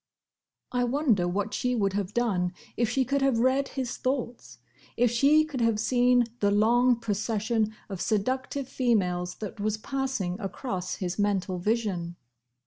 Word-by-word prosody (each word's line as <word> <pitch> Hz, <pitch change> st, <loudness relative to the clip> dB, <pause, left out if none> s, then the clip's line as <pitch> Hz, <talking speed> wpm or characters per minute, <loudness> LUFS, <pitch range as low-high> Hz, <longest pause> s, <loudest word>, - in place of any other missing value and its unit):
I 245 Hz, 0 st, +1 dB
wonder 245 Hz, -, +2 dB
what 200 Hz, +4 st, -2 dB
she 250 Hz, 0 st, 0 dB
would 200 Hz, -4 st, +1 dB
have 200 Hz, -1 st, -2 dB
done 195 Hz, -7 st, 0 dB, 0.2 s
if 235 Hz, -2 st, +1 dB
she 265 Hz, -2 st, +1 dB
could 275 Hz, +1 st, 0 dB
have 270 Hz, -3 st, +3 dB
read 260 Hz, +3 st, +2 dB
his 260 Hz, -3 st, -4 dB
thoughts, 245 Hz, -, -3 dB, 0.4 s
if 240 Hz, -1 st, +3 dB
she 285 Hz, +6 st, +4 dB
could 285 Hz, -5 st, -4 dB
have 230 Hz, -2 st, +2 dB
seen 245 Hz, +1 st, +3 dB, 0.2 s
the 205 Hz, -, +3 dB
long 240 Hz, +5 st, +4 dB
procession 220 Hz, 0 st, -1 dB
of 195 Hz, -3 st, -6 dB
seductive 255 Hz, +5 st, -1 dB
females 180 Hz, -9 st, 0 dB
that 210 Hz, -1 st, -7 dB
was 215 Hz, +1 st, 0 dB
passing 230 Hz, -7 st, -2 dB
across 190 Hz, -2 st, -4 dB
his 180 Hz, +1 st, -4 dB
mental 190 Hz, -3 st, 0 dB
vision. 190 Hz, -4 st, -1 dB
225 Hz, 150 wpm, -27 LUFS, 195-250 Hz, 0.4 s, she